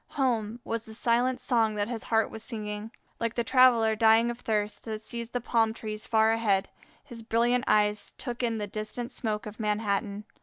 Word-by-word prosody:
home! 235 -4 0
was 230 0 -3
the 220 - -9
silent 245 +3 +1
song 225 -4 +1
that 205 0 -1
his 235 -2 -5
heart 225 -1 +1
was 220 - -6
singing. 215 -2 -5 0.3
Like 230 -1 -2
the 235 - 0
traveller 240 -4 +5
dying 225 +2 +4
of 240 - -8
thirst, 210 -3 -1
that 220 -1 -4
sees 235 +1 -5
the 245 - -2
palm 225 -2 +1
trees 215 -1 -6
far 220 -1 +4
ahead, 205 -4 +1 0.3
his 240 -5 -9
brilliant 240 +3 +1
eyes 210 0 +2
took 245 -2 -4
in 230 -2 0
the 210 - -2
distant 215 +4 -5
smoke 215 -3 -3
of 210 +1 -9
Manhattan. 210 -1 -1
225 Hz, 190 wpm, -28 LUFS, 215-235 Hz, 0.3 s, traveller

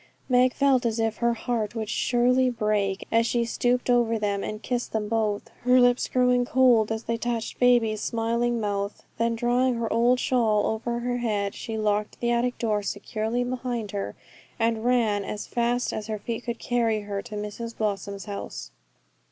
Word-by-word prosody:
Meg 250 -1 +3
felt 275 -3 +3
as 230 -1 0
if 225 -1 0
her 235 0 +1
heart 230 -1 -2
would 220 -1 -3
surely 250 +3 +2
break 210 -4 -1
as 230 +1 +3
she 235 0 +1
stooped 245 +1 0
over 240 -2 +3
them, 205 -2 -1
and 215 0 -5
kissed 245 -1 -2
them 215 -1 -1
both, 215 -2 -1
her 250 +1 +5
lips 245 0 +3
growing 250 -1 +3
cold 245 -4 +4
as 220 0 -2
they 230 - -2
touched 230 -1 -3
baby's 235 -4 +3
smiling 235 +1 0
mouth. 200 -1 -3 0.2
Then 230 0 +1
drawing 245 +2 +2
her 230 -1 -2
old 245 +2 +3
shawl 220 -6 +2
over 235 +2 -2
her 245 0 -1
head, 210 -4 -1
she 225 -1 -5
locked 210 -1 -1
the 240 0 0
attic 240 +1 0
door 215 -3 0
securely 215 +4 -2
behind 245 -4 -3
her, 200 -1 -4 0.4
and 225 -1 0
ran 230 -5 +2
as 210 +1 -5
fast 240 +1 0
as 215 0 -4
her 215 -1 -2
feet 230 +3 -5
could 235 -1 -3
carry 230 -3 0
her 200 -1 -4
to 215 -1 -9
Mrs 210 +3 -6
Blossom's 200 -2 -3
house. 205 -2 -6
230 Hz, 180 wpm, -26 LUFS, 215-245 Hz, 0.4 s, her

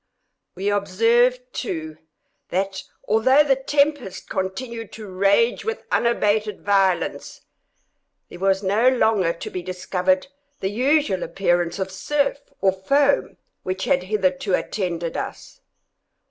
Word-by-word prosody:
We 195 +2 -1
observed 230 +5 +2
too, 160 -8 -4 0.5
that, 190 +1 -2 0.2
although 260 +7 +5
the 275 -2 +3
tempest 280 -5 0
continued 225 +4 -4
to 220 - -8
rage 200 +5 +2
with 450 +1 -4
unabated 215 -2 +1
violence, 195 -3 +1 0.9
there 175 - -11
was 195 +1 +1
no 210 +6 +3
longer 220 -8 +2
to 170 - -7
be 180 - -4
discovered 185 +1 0 0.3
the 190 - -2
usual 255 - +2
appearance 175 -2 0
of 190 -1 -3
surf, 280 +9 0 0.2
or 195 - +4
foam, 275 +10 +1 0.2
which 185 +1 -3
had 180 - +2
hitherto 185 -1 0
attended 170 -4 -3
us. - - -6
200 Hz, 120 wpm, -22 LUFS, 185-240 Hz, 0.9 s, although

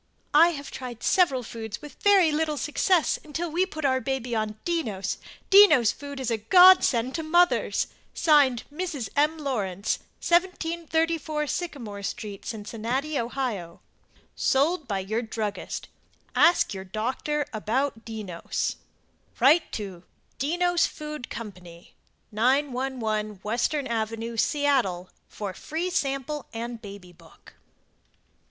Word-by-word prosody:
I 315 +3 +8
had 290 -5 -4
tried 245 -3 -8
several 280 -9 +3
foods 220 -2 -7
with 295 -3 -13
very 390 -6 +5
little 305 0 0
success 330 +4 +1
until 320 +2 -4
we 360 +4 +1
put 315 -5 -5
our 260 -1 +2
baby 250 -1 -3
on 215 -1 -2
DENNOS. 225 - -2 0.3
DENNOS 310 - +8
FOOD 285 -1 -8
is 255 -3 -2
a 225 - +1
Godsend 265 - +6
to 330 - -2
mothers. 345 +3 +2 0.3
(Signed) 285 -7 +4
Mrs. 300 - -4
M. 300 +2 +2
Lawrence. 215 - -2 0.3
1734 330 -3 0
Sycamore 260 - -4
St., 200 0 -5
Cincinnati, 235 +7 -3
Ohio. 230 -8 -3 0.6
SOLD 295 +3 +1
BY 200 -3 -1
YOUR 220 +5 -2
DRUGGIST 220 -3 -4 0.5
Ask 340 -9 +4
your 190 -1 -6
doctor 255 +9 -2
about 225 +3 -1
"Dennos" 210 -7 -4 0.6
Write 300 +7 +5
to 195 -5 -5 0.4
DENNOS 350 +5 +2
FOOD 300 -4 -7
CO. 220 -3 -6 0.8
911 245 -4 0
Western 245 +6 0
Ave., 225 0 -3
Seattle 245 -11 +1 0.2
for 200 -3 -6
Free 335 - -4
Sample 275 -3 -2
and 235 0 -5
Baby 200 -4 -10
Book. 165 -1 -19
265 Hz, 120 wpm, -26 LUFS, 220-310 Hz, 0.8 s, I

